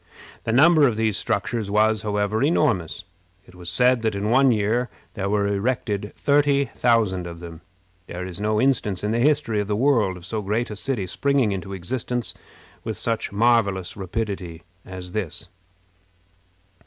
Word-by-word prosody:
The 115 Hz, -, 0 dB
number 150 Hz, +4 st, +6 dB
of 115 Hz, -4 st, -1 dB
these 110 Hz, -2 st, +1 dB
structures 115 Hz, -4 st, -1 dB
was, 110 Hz, +1 st, +2 dB
however, 105 Hz, 0 st, -1 dB
enormous. 120 Hz, -, +1 dB, 0.4 s
It -, -, -18 dB
was 90 Hz, -1 st, -7 dB
said 125 Hz, +5 st, +3 dB
that 110 Hz, -2 st, -1 dB
in 105 Hz, +2 st, -1 dB
one 135 Hz, +1 st, +5 dB
year 115 Hz, +3 st, 0 dB, 0.2 s
there 100 Hz, -2 st, -3 dB
were 105 Hz, 0 st, +1 dB
erected 100 Hz, 0 st, -1 dB
thirty 140 Hz, -1 st, +2 dB
thousand 105 Hz, -7 st, +1 dB
of 85 Hz, -1 st, -8 dB
them. 85 Hz, -1 st, -10 dB, 0.5 s
There 90 Hz, +1 st, -6 dB
is 90 Hz, -1 st, -6 dB
no 105 Hz, +1 st, 0 dB
instance 110 Hz, -8 st, +1 dB
in 105 Hz, -, 0 dB
the 115 Hz, -, 0 dB
history 140 Hz, -5 st, +2 dB
of 105 Hz, -, -2 dB
the 105 Hz, -, 0 dB
world 110 Hz, -7 st, +2 dB
of 85 Hz, -, -11 dB
so 110 Hz, +3 st, -2 dB
great 105 Hz, +4 st, -2 dB
a -, -, -5 dB
city 110 Hz, -2 st, -2 dB
springing 135 Hz, +3 st, +1 dB
into 95 Hz, 0 st, -5 dB
existence 120 Hz, +5 st, -3 dB, 0.5 s
with -, -, -4 dB
such 115 Hz, -1 st, -1 dB
marvelous 100 Hz, -4 st, +1 dB
rapidity 95 Hz, -4 st, -4 dB, 0.2 s
as 90 Hz, -1 st, -8 dB
this. 90 Hz, -4 st, -4 dB
105 Hz, 165 wpm, -23 LUFS, 95-120 Hz, 0.5 s, number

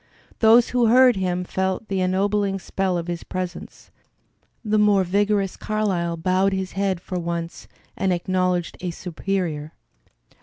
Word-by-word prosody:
Those 230 Hz, +1 st, +6 dB
who 245 Hz, -2 st, +2 dB
heard 250 Hz, +1 st, +6 dB
him 180 Hz, -1 st, -1 dB
felt 190 Hz, +3 st, -2 dB
the 195 Hz, -1 st, -1 dB
ennobling 195 Hz, +2 st, +1 dB
spell 190 Hz, -1 st, -2 dB
of 170 Hz, -, -3 dB
his 175 Hz, -1 st, -4 dB
presence; 185 Hz, -1 st, -7 dB, 0.7 s
the 215 Hz, 0 st, +2 dB
more 205 Hz, -2 st, +4 dB
vigorous 200 Hz, +1 st, 0 dB
Carlyle 190 Hz, -6 st, -1 dB
bowed 185 Hz, +3 st, +1 dB
his 190 Hz, -1 st, -3 dB
head 195 Hz, -2 st, -1 dB
for 180 Hz, +1 st, -5 dB
once 170 Hz, 0 st, -5 dB, 0.3 s
and 190 Hz, -, 0 dB
acknowledged 180 Hz, 0 st, -1 dB
a 180 Hz, -, -2 dB
superior. 170 Hz, -3 st, -3 dB
190 Hz, 140 wpm, -23 LUFS, 180-200 Hz, 0.7 s, Those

